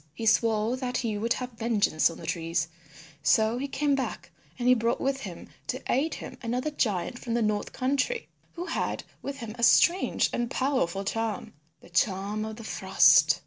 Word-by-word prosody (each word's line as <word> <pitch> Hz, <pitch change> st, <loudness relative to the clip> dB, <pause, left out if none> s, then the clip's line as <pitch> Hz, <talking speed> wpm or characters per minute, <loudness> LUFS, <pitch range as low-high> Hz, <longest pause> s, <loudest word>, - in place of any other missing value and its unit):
He 225 Hz, -, -4 dB
swore 225 Hz, +1 st, +3 dB
that 255 Hz, -1 st, -2 dB
he 225 Hz, -3 st, -1 dB
would 230 Hz, +3 st, +1 dB
have 250 Hz, 0 st, -5 dB
vengeance 220 Hz, -9 st, +2 dB
on 165 Hz, -, -9 dB
the -, -, -9 dB
trees. 165 Hz, -1 st, -1 dB, 0.5 s
So 220 Hz, +8 st, +3 dB
he 280 Hz, -, -2 dB
came 285 Hz, +1 st, 0 dB
back 270 Hz, -1 st, -3 dB
again -, -, -32 dB
and 245 Hz, -1 st, -1 dB
he 250 Hz, -, +8 dB
brought 235 Hz, 0 st, +1 dB
with 270 Hz, 0 st, 0 dB
him -, -, -8 dB, 0.2 s
to -, -, -2 dB
aid 290 Hz, +6 st, +1 dB
him -, -, -9 dB
another 250 Hz, +5 st, -2 dB
giant 215 Hz, -4 st, -1 dB
from 235 Hz, -2 st, -3 dB
the 240 Hz, -, +1 dB
north 210 Hz, -1 st, -1 dB
country 280 Hz, -, -1 dB, 0.3 s
who 350 Hz, +1 st, -5 dB
had -, -, -2 dB, 0.2 s
with 280 Hz, 0 st, -5 dB
him 230 Hz, -4 st, -7 dB
a -, -, -2 dB
strange 350 Hz, +9 st, +4 dB
and 240 Hz, 0 st, -1 dB
powerful 255 Hz, -9 st, 0 dB
charm, 225 Hz, 0 st, -2 dB, 0.3 s
the -, -, -16 dB
Charm 200 Hz, +4 st, 0 dB
of 220 Hz, 0 st, -6 dB
the 225 Hz, -, -10 dB
Frost. -, -, +5 dB
230 Hz, 190 wpm, -28 LUFS, 215-260 Hz, 0.5 s, he